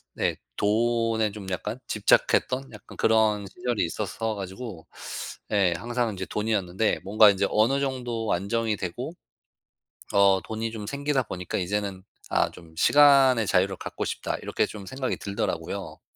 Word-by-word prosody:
네 - - 0 0.2
돈에 115 0 +1
좀 100 -2 -9
약간 90 - -3
집착했던 130 0 +2
약간 105 - -13
그런 110 -2 +3
시절이 120 -2 -1
있었어 110 +6 -3
가지고 95 -1 -7 0.6
예 95 -4 +3
항상 120 +1 -1
이제 95 0 -4
돈이었는데 105 -1 0
뭔가 105 +2 +7
인제 100 0 +2
어느 120 +6 +3
정도 125 -5 -2
안정이 110 +4 0
되고 120 - -5 1.0
어 100 -1 +5
돈이 110 +1 -4
좀 110 -2 -6
생기다 140 +1 0
보니까 90 -5 -4
이제는 100 0 -2 0.3
'아 - - +2
좀 80 -2 -15
시간의 135 -3 +6
자유를 95 +1 +2
갖고 - - -5
싶다.' - - -3
이렇게 - - 0
좀 105 -2 -9
생각이 130 +3 -3
들더라고요. 100 0 -4
110 Hz, 310 characters per minute, -26 LUFS, 100-120 Hz, 1.0 s, 뭔가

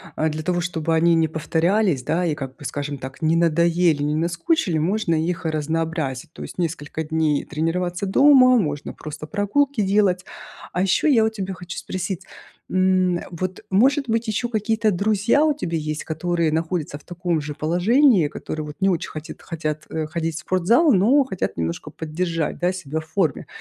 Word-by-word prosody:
э, 160 - +1
для 155 0 -4
того, 175 0 0
чтобы 165 -2 -2
они 170 +1 +4
не 165 -1 +3
повторялись, 160 - +1
да, 165 +6 0
и, 160 -3 0
как 135 -3 -7
бы, 150 - -14
скажем 145 0 -4
так, 130 +1 -9
не 160 +1 +2
надоели, 170 -1 +3
не 150 +1 0
наскучили, 170 - 0
можно 170 +2 +1
их 165 +2 -2
разнообразить. 160 -2 -2
То - - -8
есть - - -9
несколько 160 -2 -3
дней 155 -2 0
тренироваться 175 +5 -2
дома, 255 +3 +6
можно 150 -6 -3
просто 155 0 -8
прогулки 215 - +1
делать. 195 -2 +2 0.5
А 180 - 0
ещё 190 +9 +2
я 235 -7 +5
у - - +2
тебя 195 -3 -5
хочу 180 -1 -8
спросить, 185 -1 -4 0.5
м, 185 -1 +2
вот, 185 +2 -4
может 270 +8 +3
быть, 225 +1 0
ещё 220 +3 -1
какие-то 220 -1 0
друзья 210 - +2
у 305 -2 +2
тебя 170 - -3
есть, 155 -1 -3
которые 165 0 -1
находятся 160 -2 -2
в - - -22
таком 175 -2 -2
же 150 0 -6
положении, 180 - +3
которые 155 +1 -5
вот 150 -1 -8
не 195 0 +3
очень 175 -4 -1
хотит 155 +1 -8
хотят, 155 -2 -4
э, 160 -1 -2
ходить 165 0 -3
в - - -4
спортзал, 220 - +3
но 240 +10 +4
хотят 220 -9 -4
немножко 85 0 -3
поддержать, 165 0 -3
да, 175 +1 +2
себя 160 -4 -4
в 155 - -10
форме? 160 -5 -1
170 Hz, 180 wpm, -22 LUFS, 155-195 Hz, 0.5 s, дома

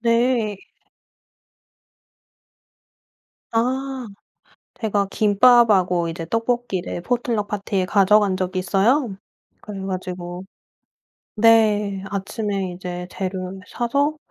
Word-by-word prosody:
네. 230 -2 +1 3.0
아. 260 +2 -1 0.7
제가 205 -3 0
김밥하고 205 -5 +4
이제 165 0 -5
떡볶이를 230 -4 -2
포틀럭 235 0 -1
파티에 200 -2 -2
가져간 200 0 +4
적이 185 0 -2
있어요. 200 - +1 0.5
그래 205 -2 -7
가지고 180 -1 -5 0.9
네 210 -3 +3
아침에 200 -1 -3
이제 180 0 -6
재료를 185 0 -4
사서 280 +6 0
205 Hz, 185 characters per minute, -22 LUFS, 185-230 Hz, 3.0 s, 김밥하고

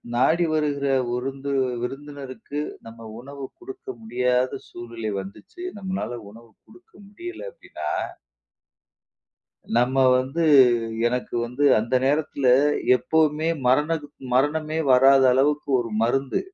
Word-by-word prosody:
நாடி 165 +7 +3
வருகிற 145 -2 0 0.2
விருந்து 135 +3 -3 0.3
விருந்தினருக்கு 140 +1 -6 0.3
நம்ம 115 0 -11
உணவு 140 +1 -8
குடுக்க 390 +2 -11
முடியாத 125 - 0
சூழ்நிலை 115 -2 -6
வந்துச்சு, 105 - -12
நம்மானால 185 - -4
உணவு 115 0 -16
குடுக்க 365 +5 -20 0.2
முடியல 355 - -8
அப்பிடீன்னா - - -7 1.9
நம்ம 130 +2 +1 0.2
வந்து 135 +6 -2 0.6
எனக்கு 125 0 -2
வந்து 125 +5 -2 0.2
அந்த 115 +4 -3
நேரத்ல 145 -2 0 0.5
எப்பவுமே 155 +5 +1 0.2
மரணத் 150 +3 +1 0.3
மரணமே 155 +3 +1
வராத 135 +1 +6
அளவுக்கு 145 +3 +1
1 115 -2 -5
மருந்து. 135 +3 0
140 Hz, 100 wpm, -24 LUFS, 125-155 Hz, 1.9 s, வராத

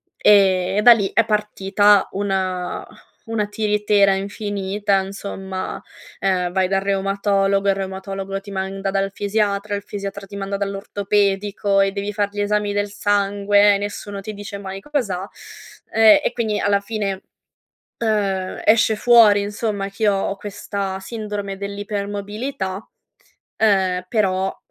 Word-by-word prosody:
e 190 -2 +4
e - - +3
da 240 +2 +9
lì 200 -4 -1
è 230 - +4
partita 205 -1 +2
una 190 -2 -2 0.4
una 225 -2 -1
tiritera 210 -1 +2
infinita 200 0 -1
insomma, 195 -1 -6 0.4
ehm, 180 -2 0
vai 190 -1 +1
dal 195 0 +2
reumatologo, 195 0 +1
il 195 - +3
reumatologo 195 0 -5
ti 200 +1 -12
manda 195 0 -3
dal 195 0 -1
fisiatra, 205 0 -1
il 200 - -4
fisiatra 200 -1 -6
ti 200 +1 -9
manda 200 0 -3
dall'ortopedico 200 0 0
e 195 0 +2
devi 200 +1 -4
fare 205 -1 0
gli 205 - -6
esami 205 0 0
del 205 0 -1
sangue, 205 0 +3
e - - +1
nessuno 205 0 -5
ti 215 +2 -6
dice 200 -1 -7
mai 195 -1 -6
cos'ha. 205 -8 -3 0.6
Ehm, 225 +5 +7
e - - +1
quindi 220 -3 -1
alla 200 0 +2
fine, 200 -2 -3 0.8
ehm, 200 -4 -1
esce 220 0 +4
fuori 220 -3 +6
insomma 205 -1 -3
che 210 +2 0
ho 195 -1 0
questa 200 -1 -4
sindrome 205 -2 -5
dell'ipermobilità, 200 +1 -4 0.7
ehm, 190 -4 +2
però 190 -3 0
200 Hz, 135 wpm, -21 LUFS, 195-210 Hz, 0.8 s, da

